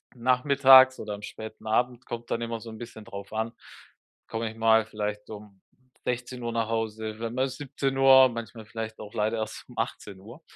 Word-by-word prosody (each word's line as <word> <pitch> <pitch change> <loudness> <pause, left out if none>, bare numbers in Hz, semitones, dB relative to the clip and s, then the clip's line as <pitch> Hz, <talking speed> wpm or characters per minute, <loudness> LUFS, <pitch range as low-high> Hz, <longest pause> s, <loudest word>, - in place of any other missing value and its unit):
Nachmittags 130 +1 +6
oder 105 -1 -5
am 100 - -11
späten 110 0 -9
Abend 125 +3 0
kommt 120 0 -7
dann 115 - 0
immer 115 -1 -3
so 115 - -9
'n 110 - -9
bisschen 115 -1 -9
drauf 100 -2 -9
an, 110 +1 -1 0.8
komme 115 0 -3
ich - - -14
mal 110 -1 +4
vielleicht 105 -1 -5
um 105 -2 -11 0.5
16:00 125 -1 -3
nach 115 -1 -1
Hause, 110 -1 -3
w 115 0 -3
mal 130 +2 0
17:00, 135 -1 +4
manchmal 115 -1 -7
vielleicht 110 0 -6
auch 105 - -9
leider 110 0 0
erst 110 0 -5
um - - -14
18:00. 105 - -5
115 Hz, 175 wpm, -27 LUFS, 110-125 Hz, 0.8 s, Nachmittags